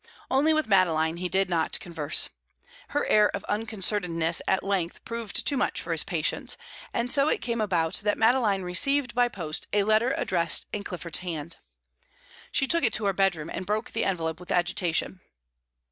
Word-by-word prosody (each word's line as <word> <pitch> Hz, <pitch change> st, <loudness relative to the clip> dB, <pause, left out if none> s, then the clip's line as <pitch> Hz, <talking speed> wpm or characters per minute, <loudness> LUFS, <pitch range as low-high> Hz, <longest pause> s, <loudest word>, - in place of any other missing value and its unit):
Only 280 Hz, +4 st, +4 dB
with 310 Hz, 0 st, +2 dB
Madeline 165 Hz, -5 st, +3 dB
he 180 Hz, +1 st, -3 dB
did 190 Hz, +1 st, +2 dB
not 165 Hz, -3 st, 0 dB
converse. 155 Hz, -4 st, -1 dB, 0.6 s
Her 290 Hz, -, -1 dB
air 210 Hz, -1 st, +5 dB
of 200 Hz, -, -5 dB
unconcernedness 195 Hz, -6 st, 0 dB
at 190 Hz, -, +2 dB
length 190 Hz, -4 st, -2 dB
proved 230 Hz, -2 st, -3 dB
too 285 Hz, -, +2 dB
much -, -, 0 dB
for -, -, -5 dB
his -, -, +1 dB
patience, -, -, -2 dB, 0.3 s
and 240 Hz, +1 st, 0 dB
so 280 Hz, 0 st, +4 dB
it -, -, +1 dB
came 235 Hz, -2 st, -2 dB
about 170 Hz, -6 st, +1 dB
that 210 Hz, 0 st, +1 dB
Madeline 225 Hz, -4 st, +3 dB
received 255 Hz, +9 st, +1 dB
by 245 Hz, 0 st, +3 dB
post 165 Hz, -9 st, -4 dB
a 205 Hz, -1 st, +3 dB
letter 220 Hz, +5 st, +2 dB
addressed 170 Hz, -3 st, +1 dB
in 205 Hz, -, -3 dB
Clifford's 170 Hz, -4 st, -2 dB
hand. 165 Hz, -2 st, -5 dB, 0.9 s
She 270 Hz, -, +2 dB
took 335 Hz, +4 st, 0 dB
it 230 Hz, -, +2 dB
to 215 Hz, -, -1 dB
her 195 Hz, -, +2 dB
bedroom, 175 Hz, -5 st, 0 dB
and -, -, -4 dB
broke 215 Hz, +2 st, -1 dB
the -, -, -1 dB
envelope 165 Hz, -3 st, -1 dB
with 180 Hz, -, -8 dB
agitation. 175 Hz, 0 st, 0 dB
195 Hz, 175 wpm, -27 LUFS, 170-225 Hz, 0.9 s, air